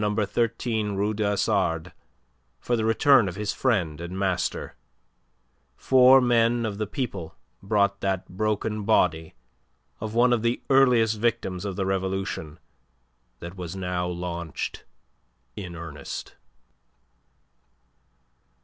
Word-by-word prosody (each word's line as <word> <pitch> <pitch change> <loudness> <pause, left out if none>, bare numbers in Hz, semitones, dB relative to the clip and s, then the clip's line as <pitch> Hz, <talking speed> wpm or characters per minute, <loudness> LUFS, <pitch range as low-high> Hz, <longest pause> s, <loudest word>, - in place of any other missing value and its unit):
13 110 +1 -1
Rue 105 +2 0
du 110 0 -2
Hasard 95 -5 0 0.7
for 120 - -1
the 110 - -1
return 115 0 +4
of 85 - -8
his 105 0 -2
friend 85 - 0
and 85 +2 -6
master, 95 -3 -2 1.0
four 130 0 +6
men 120 -1 +2
of 105 -2 -4
the 110 - -1
people 100 - -5 0.3
brought 100 0 +1
that 95 -2 -1
broken 110 +2 -2
body 80 -6 +1 0.6
of 110 +1 -5
one 120 +1 +4
of 120 - +1
the 120 +1 0
earliest 120 -5 +4
victims 105 -5 -1
of 100 -2 -3
the 95 - -1
Revolution 95 -4 -3 0.8
that 85 +2 -8
was 90 -1 -6
now 90 -1 -2
launched 85 -2 -5 0.7
in 90 -3 -7
earnest. 80 -3 -7
100 Hz, 115 wpm, -25 LUFS, 90-115 Hz, 1.0 s, four